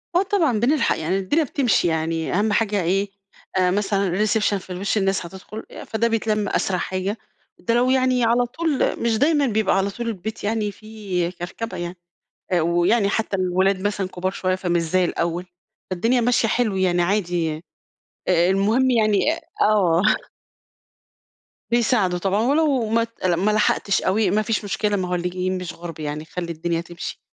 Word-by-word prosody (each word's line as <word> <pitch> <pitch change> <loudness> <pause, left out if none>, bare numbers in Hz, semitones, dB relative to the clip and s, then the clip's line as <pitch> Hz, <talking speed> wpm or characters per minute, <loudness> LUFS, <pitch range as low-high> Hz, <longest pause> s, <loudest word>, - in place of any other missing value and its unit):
آه، 360 - +4
طبعًا، 330 - +1
بنلحق، 265 +2 +2
يعني 170 +5 -1
الدنيا 290 - +1
بتمشي 250 - +1
يعني، 160 0 -1
أهَم 210 +3 +1
حاجة 205 -3 +1
إيه، 195 +4 0 0.5
آآ، 180 -1 +3
مثلًا 200 -1 0 0.2
الreception 210 -1 +1
في 190 - -12
الوِش 190 +4 -1
الناس 195 -2 0
هتدخل 190 +5 -9
آآ، - - -8
فده 225 +1 0
بيتلم 215 -2 0
أسرع 185 -2 0
حاجة. 190 +4 -2 0.4
ده 230 - -1
لو 245 +2 +3
يعني 255 -1 +2
على 240 +2 +3
طول 310 +3 -1
مش 225 -2 +2
دايمًا 290 +1 +3
بيبقى 215 -4 +1
على 195 +1 +1
طول 235 +4 -5
البيت 220 0 -5
يعني 210 0 -1
فيه 200 -4 -4
كركبة 180 +6 -6
يعني. 175 +1 -5 0.6
آآ، 175 - +3
ويعني 175 +6 +2
حتى 205 -1 -1
الولاد 185 +1 +1
مثلًا 200 -1 -1
كبار 185 +1 -3
شوية، 185 -1 -1
فمش 175 -2 0
زي 180 +3 +1
الأول، 170 +1 -2 0.4
فالدنيا 230 +7 +1
ماشية 235 -1 +2
حلو 220 -5 +1
يعني 180 -2 +2
عادي 175 -4 0
آآ، 160 - -12 0.7
آآ، 175 0 +4
المهم 220 +7 +2
يعني 215 -4 +3 0.4
آه. 185 -5 +3 1.7
بيساعدوا 215 -7 +2
طبعًا 195 +3 +1
ولو 280 -1 +2
ما 230 +1 +2
ت 230 -4 -8
ما 185 +4 +2
لحقتش 210 -2 +2
أوي، 200 +1 +2
ما 210 +2 +2
فيش 215 0 -1
مشكلة. 205 +1 0
ما 185 -2 -2
هو 180 - -1
اللي 180 0 -1
جايين 185 +1 -2
مش 180 -3 -6
غُرب 165 -2 -9
يعني، 150 0 -4
خلّي 170 0 -5
الدنيا 165 +1 -2
تمشي. 175 0 -8
200 Hz, 170 wpm, -22 LUFS, 180-225 Hz, 1.7 s, آه